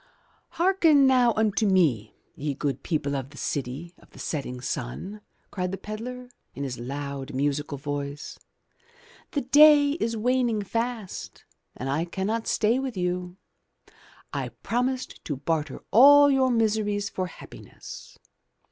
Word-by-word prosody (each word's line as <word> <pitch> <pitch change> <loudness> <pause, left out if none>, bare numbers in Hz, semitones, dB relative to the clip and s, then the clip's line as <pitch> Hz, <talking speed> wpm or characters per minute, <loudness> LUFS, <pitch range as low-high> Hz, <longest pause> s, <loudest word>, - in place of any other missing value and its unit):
* - - -38
'Hearken 335 -6 +4
now 250 -2 +5
unto 215 0 +1
me, 150 - +2 0.2
ye 145 -1 -3
good 140 0 -2
people 145 -4 -1
of 135 -1 -4
the 145 - -15
city 140 +5 -4
of - - -21
the - - -18
setting 130 -5 -4
sun," 130 - -5 0.3
cried 180 -2 -2
the 195 - -4
pedlar, 250 +5 -7 0.2
in 140 - -4
his 130 -3 -4
loud, 140 +2 -5
musical 145 +1 -1
voice. 145 0 -5 0.9
*The 285 - -1
day 290 +2 +7
is 230 -7 -2
waning 240 -2 +1
fast, 230 -1 -4 0.3
and 130 - -4
I 145 +5 0
cannot 200 +6 -2
stay 230 +4 +2
with 265 -5 -4
you. 180 0 -2 1.0
I - - -2
promised 255 +2 -2
to 145 - -2
barter 150 +3 -3
all 285 +4 +8
your 265 -1 +3
miseries 215 -3 +1
for 185 -1 -2
happiness. - - -12
195 Hz, 140 wpm, -26 LUFS, -, 1.0 s, all